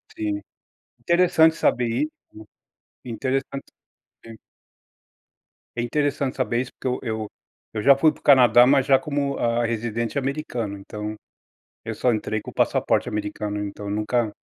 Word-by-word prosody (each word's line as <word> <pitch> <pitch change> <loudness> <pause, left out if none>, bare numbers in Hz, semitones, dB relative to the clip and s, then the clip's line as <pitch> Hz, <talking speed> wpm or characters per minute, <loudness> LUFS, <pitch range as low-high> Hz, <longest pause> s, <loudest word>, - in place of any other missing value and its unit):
Sim. 105 -1 -2 0.6
Interessante 170 -2 +4
saber 125 -6 +1
isso, 300 - -1 0.9
né, 125 - -7
interessante 135 +4 -2 0.6
saber. 115 -1 -12 1.4
É 120 - -1
interessante 140 +1 -1
saber 125 -2 0
isso, 130 - -7
porque - - -6
eu 125 - -1
eu 110 -3 -3 0.4
eu 105 -1 -4
já 140 +3 +7
fui 155 +3 +4
pro - - -18
Canadá, 125 -3 +7
mas 135 +1 +3
já 135 - +6
como, 140 -2 -2
hã, 120 0 +1
residente 115 +1 -2
americano. 135 -6 -3
Então, 105 +2 -6 0.7
eu - - -5
só 125 - +2
entrei 110 0 -2
com - - -9
o - - -23
passaporte - - +1
americano, 105 0 -4
então 100 0 -6
nunca 105 +2 0
120 Hz, 145 wpm, -23 LUFS, 110-140 Hz, 1.4 s, já